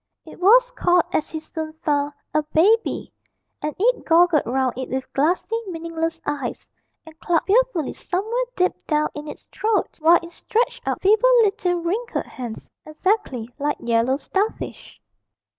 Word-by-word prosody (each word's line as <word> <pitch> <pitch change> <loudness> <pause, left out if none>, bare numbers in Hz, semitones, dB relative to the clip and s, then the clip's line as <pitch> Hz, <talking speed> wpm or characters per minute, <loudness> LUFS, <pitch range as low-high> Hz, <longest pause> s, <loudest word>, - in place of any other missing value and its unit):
It - - -13
was 485 +7 +5
called 355 -7 +3
as 305 - 0
he 315 - -4
soon 315 0 -6
found, 290 -2 -1 0.2
a 305 - +3
'Baby,' 375 +10 +1 0.5
and 300 0 -3
it - - +2
goggled 335 -5 +4
round 260 +1 0
it 260 +1 -5
with 260 0 -4
glassy, 340 +10 +1
meaningless 330 -1 -3
eyes, 285 -4 -4 0.4
and 320 0 -15
clucked 335 -2 +1
fearfully 410 - +2
somewhere 445 +7 -2
deep 365 0 +2
down 300 -1 +1
in 295 0 -7
its - - -9
throat, 435 -4 -1
while 335 +2 +7
it 335 - -10
stretched 465 +6 -1
out - - -2
feeble 435 +5 +5
little 390 -4 +1
wrinkled 420 +8 -2
hands, 240 -4 -8 0.2
exactly 310 - -1
like 295 +1 0
yellow 235 +2 +1
starfish. 395 +9 -4
330 Hz, 150 wpm, -22 LUFS, 295-405 Hz, 0.5 s, while